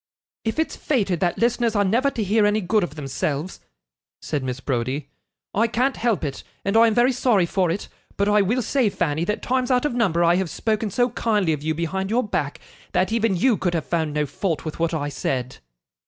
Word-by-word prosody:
'If 225 +4 -2
it's 320 - 0
fated 200 - 0
that 175 -2 0
listeners 235 -1 +1
are 205 - +3
never 235 +8 +2
to 235 -5 -3
hear 210 +1 +3
any 210 +1 +2
good 210 +1 +1
of 150 -3 -4
themselves,' 145 +3 -3 0.6
said 150 -3 -3
Mrs. 130 0 -5
Browdie, 130 +2 -2 0.4
'I 225 +4 +3
can't 255 +4 0
help 230 -3 0
it, 140 -3 -3 0.2
and 195 +2 0
I 230 +1 +7
am 220 - +1
very 245 +2 +4
sorry 240 -7 +2
for 180 0 0
it. 180 +5 -3 0.3
But 200 - +1
I 210 0 +4
will 235 +6 +1
say, 250 0 +2
Fanny, 165 -3 -1
that 210 - -2
times 255 0 0
out 250 +1 +2
of 295 - 0
number 190 -8 +2
I 170 +1 +4
have 190 -2 -1
spoken 215 +2 -1
so 245 +5 +1
kindly 210 -8 +1
of 150 - -4
you 155 +1 -1
behind 190 +4 -2
your 240 +4 +2
back, 145 -7 -2 0.3
that 190 - +1
even 225 -3 +1
you 235 +3 +3
could 175 -2 -1
have 160 - -1
found 160 -3 -1
no 150 0 +1
fault 160 +4 -3
with 155 - -5
what 165 0 +1
I 145 -2 -2
said. 130 -2 -3
195 Hz, 220 wpm, -23 LUFS, 160-230 Hz, 0.6 s, I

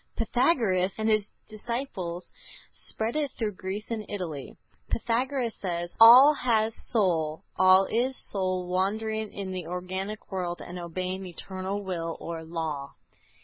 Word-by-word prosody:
Pythagoras 225 - +2
and 220 0 -1
his 215 -2 +2 0.2
disciples 215 -6 -5 0.4
spread 220 +3 -4
it 300 -2 0
through 220 -3 -1
Greece 195 +3 -6
and 220 -2 -2
Italy. 165 -9 -5 0.3
Pythagoras 240 +1 0
says: 175 -2 -3
"All 250 +6 +10
has 225 -5 +1 0.2
soul; 165 -8 +1
all 185 +1 +6
is 250 +5 0
soul 185 -2 -1
wandering 215 +4 -1
in 195 -2 -5
the 185 -3 -5
organic 190 +4 -5
world, 180 -2 -3
and 180 +1 -7
obeying 185 +2 -4
eternal 190 +3 -5
will 165 -3 -3
or 165 -1 -5
law." 160 -4 -4
190 Hz, 130 wpm, -27 LUFS, 180-225 Hz, 0.4 s, All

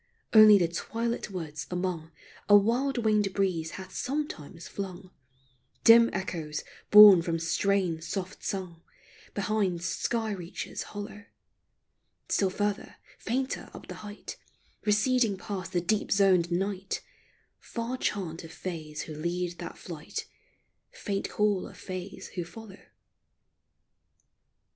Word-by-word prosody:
Only 215 -2 +9
the 175 -3 +2
twilit 230 +7 -3
woods 160 -5 -6
among 180 -3 -3 0.4
A 205 - +10
wild 245 +6 +1
winged 215 -3 +2
breeze 180 -5 0
hath 190 0 -9
sometimes 195 - -4
flung 185 -1 -7 0.7
Dim 230 +1 +8
echoes 165 -5 -4 0.3
borne 210 -4 +10
from 165 0 -1
strains 170 0 0
soft 190 -1 -5
sung 180 -4 -4 0.5
Beyond 200 -4 0
sky 225 +4 -1
reaches 180 -3 -5 0.2
hollow; 205 0 -7 1.0
Still 195 - +2
further, 205 +2 -2 0.2
fainter 260 +3 -2
up - - -10
the - - -4
height, 210 0 -8 0.5
Receding 215 0 +3
past 185 -2 -5
the 175 -2 +1
deep 205 +4 0
zoned 185 -3 +4
night 195 +2 -2 0.3
— - - -40
Far 235 +2 -2
chant 180 -10 -3
of 165 - -10
Fays 155 -5 -5
who 155 - -8
lead 175 +3 -3
that - - -7
flight, - - -6 0.6
Faint 200 -2 -3
call 210 -3 +1
of - - -13
Fays 185 +1 -7
who 175 - -4
follow. 200 +3 -11
195 Hz, 120 wpm, -29 LUFS, 175-210 Hz, 1.0 s, A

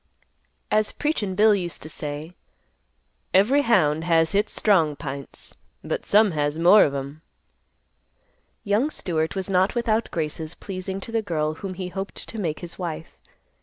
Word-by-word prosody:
As 215 0 +2
"Preachin' 220 -11 -1
Bill" 215 +2 +6
used 175 -5 -2
to - - -7
say, 150 +2 -6 1.0
"Every 240 +10 +5
hound 160 - +3
has 165 -1 +3
hits 205 +2 +1
strong 165 -8 +3
pints, 140 -2 -6 0.3
but - - -4
some 210 0 +5
has 145 -1 -1
more 180 +5 +7
of 140 - -2
'em." 140 +3 -6 1.4
Young 215 +7 +1
Stewart 160 - -2
was 190 -1 -2
not 190 +2 +2
without 230 -1 +1
graces 160 0 -3
pleasing 190 0 -5
to 230 - -8
the 225 -1 +1
girl 155 -6 -1
whom 185 +3 -6
he 180 0 -5
hoped 195 +2 -5
to 225 - -5
make 160 -5 -2
his 175 +1 -8
wife. 165 -3 -5
180 Hz, 155 wpm, -24 LUFS, 155-205 Hz, 1.4 s, more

